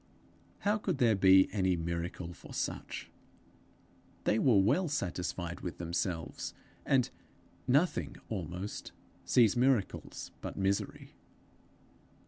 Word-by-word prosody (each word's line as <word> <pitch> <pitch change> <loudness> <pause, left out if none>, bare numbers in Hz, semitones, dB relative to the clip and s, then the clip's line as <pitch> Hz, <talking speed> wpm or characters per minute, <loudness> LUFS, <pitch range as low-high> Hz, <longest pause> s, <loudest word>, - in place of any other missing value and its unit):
How 210 +1 +2
could 185 -7 -1
there 120 -5 +4
be 95 0 +7
any 95 -3 +2
miracle 85 +1 -3
for 75 - -11
such! - - -4 1.1
They 110 - +2
were 125 -7 +5
well 130 - +3
satisfied 90 - -3
with 90 - -5
themselves, 85 -2 -3 0.3
and 130 -3 +3 0.6
Nothing 145 +8 +2
almost 95 0 -5 0.3
sees 115 -5 +5
miracles 125 -4 0
But - - -6
misery. 100 0 -1
95 Hz, 105 wpm, -32 LUFS, 90-125 Hz, 1.1 s, be